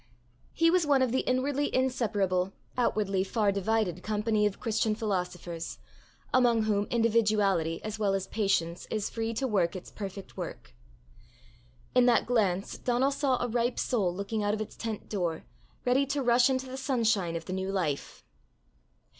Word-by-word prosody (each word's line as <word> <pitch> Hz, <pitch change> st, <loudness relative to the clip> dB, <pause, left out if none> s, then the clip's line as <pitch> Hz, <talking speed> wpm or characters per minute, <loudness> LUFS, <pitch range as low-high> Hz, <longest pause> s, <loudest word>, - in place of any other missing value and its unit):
He 330 Hz, 0 st, +3 dB
was 365 Hz, -1 st, +3 dB
one 275 Hz, -2 st, +4 dB
of 255 Hz, -, 0 dB
the 260 Hz, -, +2 dB
inwardly 280 Hz, +3 st, 0 dB
inseparable, 205 Hz, -8 st, +1 dB, 0.2 s
outwardly 205 Hz, -6 st, +1 dB
far 205 Hz, +1 st, +1 dB
divided 200 Hz, -2 st, 0 dB
company 210 Hz, 0 st, +1 dB
of 200 Hz, -, -5 dB
Christian 220 Hz, -2 st, 0 dB
philosophers, 180 Hz, -5 st, -3 dB, 0.6 s
among 240 Hz, -3 st, +4 dB
whom 205 Hz, -1 st, +1 dB
individuality 210 Hz, -8 st, +2 dB
as 215 Hz, 0 st, -5 dB
well 200 Hz, -2 st, +2 dB
as 195 Hz, -1 st, -2 dB
patience 195 Hz, -5 st, -1 dB
is 215 Hz, -2 st, -2 dB
free 225 Hz, 0 st, -2 dB
to 265 Hz, +3 st, 0 dB
work 190 Hz, -6 st, +1 dB
its 185 Hz, -, -8 dB
perfect 195 Hz, -1 st, -7 dB
work. -, -, -7 dB, 1.2 s
In 250 Hz, 0 st, +5 dB
that 240 Hz, -, +4 dB
glance 200 Hz, -6 st, 0 dB
Donal 250 Hz, +3 st, +1 dB
saw 275 Hz, -3 st, +1 dB
a -, -, 0 dB
ripe 240 Hz, +1 st, 0 dB
soul 205 Hz, -8 st, +1 dB
looking 200 Hz, +4 st, -3 dB
out 205 Hz, 0 st, +1 dB
of 215 Hz, -, -5 dB
its 215 Hz, -, -6 dB
tent 225 Hz, -2 st, -5 dB
door, 175 Hz, -6 st, -2 dB, 0.4 s
ready 260 Hz, +3 st, +3 dB
to 280 Hz, 0 st, -1 dB
rush 240 Hz, +1 st, +5 dB
into 260 Hz, 0 st, 0 dB
the 260 Hz, 0 st, -7 dB
sunshine 225 Hz, -10 st, +1 dB
of 165 Hz, -, -4 dB
the 185 Hz, -, -4 dB
new 190 Hz, +1 st, -2 dB
life. 165 Hz, -8 st, -2 dB
215 Hz, 165 wpm, -29 LUFS, 195-245 Hz, 1.2 s, In